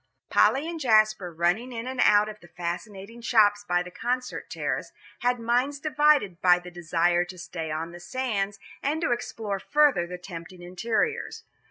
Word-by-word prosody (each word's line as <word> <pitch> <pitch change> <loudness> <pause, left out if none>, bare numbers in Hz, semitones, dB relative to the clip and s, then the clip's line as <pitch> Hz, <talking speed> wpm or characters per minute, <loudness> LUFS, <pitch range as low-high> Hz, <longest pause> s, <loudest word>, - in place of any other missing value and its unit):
Polly 280 +4 +4
and 335 -1 -5
Jasper, 215 - +3
running 175 +10 0
in 230 -1 -5
and 260 0 -2
out 210 0 +5
of 215 0 -8
the 175 - -16
fascinating 190 +6 -6
shops 205 -3 +4
by 175 -2 +1
the 180 - -10
Concert 250 +5 -3
terrace, - - -3 0.3
had 245 0 +1
minds 245 +5 +1
divided 295 - +2
by 180 -1 +6
the 180 0 -10
desire 175 0 +1
to 180 +1 -10
stay 165 -2 -6
on 160 +2 -3
the 175 - -10
sands, 205 -2 -2 0.2
and 300 +3 0
to 325 - +1
explore 220 -4 -3
further 285 -10 +3
the 180 +1 -6
tempting 175 0 -10
interiors. 220 - -2
205 Hz, 170 wpm, -26 LUFS, 175-245 Hz, 0.3 s, by